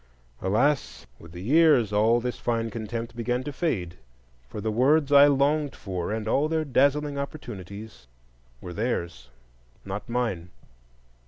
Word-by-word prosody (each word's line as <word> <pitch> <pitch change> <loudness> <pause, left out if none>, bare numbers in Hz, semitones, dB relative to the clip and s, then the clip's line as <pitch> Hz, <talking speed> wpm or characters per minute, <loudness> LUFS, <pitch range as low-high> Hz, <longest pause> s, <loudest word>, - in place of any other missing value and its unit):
Alas, 105 - 0
with 80 - -13
the 90 +1 -9
years 135 -4 +4
all 110 +3 +4
this 125 +1 -4
fine 115 -1 -1
contempt 115 +1 -5
began 120 +2 -1
to 145 - -6
fade; 95 - -2 0.5
for - - -7
the 110 +1 -2
words 140 +6 +3
I 140 0 +8
longed 145 +1 +1
for, 95 -2 -4
and 110 0 -3
all 140 +7 +2
their 160 0 -1
dazzling 140 +2 +1
opportunities, 105 - -8 0.5
were 90 - -7
theirs, 85 - -3 0.6
not 100 +3 -6
mine. 115 -8 -2
115 Hz, 140 wpm, -26 LUFS, 100-140 Hz, 0.6 s, I